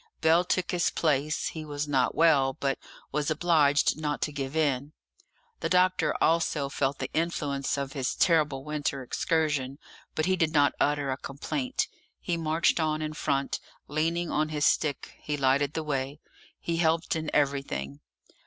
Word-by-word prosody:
Bell 160 +2 +4
took 180 0 -1
his 175 -1 +2
place; 155 -1 0
he 160 - -6
was 145 0 -4
not 130 -5 +1
well, 145 -5 +4
but 135 +1 -2 0.3
was 150 +1 -1
obliged 155 -3 +3
not 150 -1 -1
to 150 - -1
give 140 0 -4
in. 145 -2 0 0.7
The - - -2
doctor 185 0 +3
also 160 -4 +2
felt 140 0 -1
the - - -5
influence 145 -5 -1
of 140 -1 -3
his 135 -3 -2
terrible 150 -6 +2
winter 145 -2 -2
excursion, 145 -1 0 0.4
but 155 - +1
he 185 +1 +2
did 165 -3 0
not 145 -2 +4
utter 145 -2 +1
a 130 - -2
complaint; 140 -1 -3 0.3
he 175 - -2
marched 165 +1 +1
on 155 -1 0
in 155 0 -3
front, 140 -2 -1 0.3
leaning 165 +3 -1
on 155 +1 +1
his 150 -1 0
stick; 145 -3 0
he 150 -1 -3
lighted 140 +1 +2
the 160 - -1
way; 140 -1 -3 0.4
he 170 -1 -2
helped 165 0 +1
in 160 -1 -2
everything. 135 - -1
150 Hz, 160 wpm, -28 LUFS, 140-160 Hz, 0.7 s, Bell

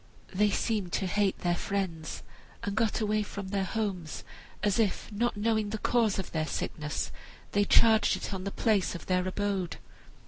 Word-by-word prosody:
They 210 +2 +4
seemed 205 -3 0
to 195 - +1
hate 200 +1 +1
their 175 -1 +2
friends, 175 -4 -3 0.4
and 200 - -2
got 225 0 +1
away 215 0 +2
from 200 -2 -5
their 195 -1 0
homes, 190 -6 -3 0.4
as 205 +1 +2
if, 220 0 0
not 225 +2 0
knowing 215 0 +1
the 220 - -2
cause 225 -2 +2
of 190 - -4
their 155 -1 -1
sickness, 150 -2 -3 0.4
they 205 0 +3
charged 220 +1 +5
it - - -5
on 190 -1 -3
the 200 - -2
place 200 -3 +1
of 175 - -7
their 180 0 +1
abode. 190 -2 -1
200 Hz, 175 wpm, -30 LUFS, 185-215 Hz, 0.4 s, charged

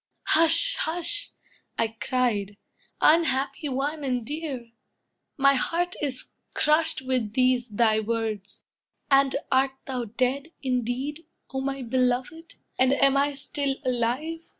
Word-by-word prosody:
—"Hush, 330 +10 +6
hush!" 350 +5 -1 0.5
I 225 - +1
cried, 220 -3 -1 0.4
"Unhappy 295 -2 +2
one, 285 +3 -2
and 250 -4 -1
dear! 280 -5 -5 0.7
My 275 0 +5
heart 340 +6 -1
is 270 -3 -2 0.2
crushed 305 -2 +2
With 255 -5 -1
these 255 -1 +2
thy 220 0 +2
words! 220 -3 -4 0.5
And 275 0 +4 0.2
art 265 +1 +3
thou 255 -3 -3
dead, 260 +8 -2
indeed, 260 +5 -2 0.3
O 265 - -2
my 270 0 -3
beloved? 255 +6 -1 0.2
and 260 +1 +4
am 275 0 +3
I 285 +1 +2
still 280 0 -2
alive? 255 +7 -1
265 Hz, 120 wpm, -25 LUFS, 245-290 Hz, 0.7 s, Hush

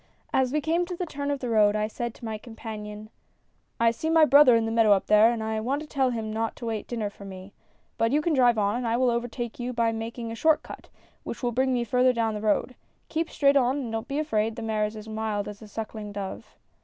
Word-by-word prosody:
As 260 -1 +2
we 300 +1 0
came 330 +4 +1
to 360 - -4
the 360 - -3
turn 285 -3 -4
of 285 -1 -2
the 250 - -3
road 210 -2 +4
I 215 0 +1
said 235 +1 -5
to - - -10
my 220 -1 -4
compan 220 -2 -8
ion: 210 +1 -9 0.2
" - - -44
' - - -44
I 230 0 +4
see 315 +7 -3
my 325 -1 +6
brother 280 -3 +7
in 225 -1 +2
the 225 - -2
meadow, 225 -2 +5
up 195 - +1
there, 215 +2 +6
and 230 -2 -3
I 220 0 -2
want 260 +6 -1
to - - -11
tell 270 -3 +1
him 220 -3 -3
not 225 0 -2
to 240 - -8
wait 220 -2 -3
dinner 220 -4 -3
for 200 - -13
me. 190 0 -10 0.5
But 230 0 +2
you 295 - +3
can 315 +1 0
drive 245 -4 +4
on, 205 0 +1
and 245 -1 -2
I 230 +1 +1
will 250 -1 +3
overtake 235 0 -4
you 245 +1 -3
by 230 -1 +1
making 225 +1 -5
a - - -5
short 315 +6 +3
cut, - - -11 0.3
which - - -7
will 240 - +1
bring 260 +3 +1
me 245 -1 +1
out 235 - -4
further 250 +1 +4
down 225 -2 0
the 210 - -4
road. 215 +4 +1 0.4
Keep 325 +1 -1
straight 280 -1 +3
on 260 0 +3
and 250 -5 -4
don't 225 0 -3
be 280 0 -3
afraid, 225 -8 0
the 230 - -6
mare 215 -1 0
is 210 +1 -5
as 215 0 -9
mild 215 -2 -2
as 210 +1 -8
a 215 - -10
sucking 215 -1 -6
dove. 195 -1 -7
230 Hz, 280 wpm, -26 LUFS, 215-255 Hz, 0.5 s, brother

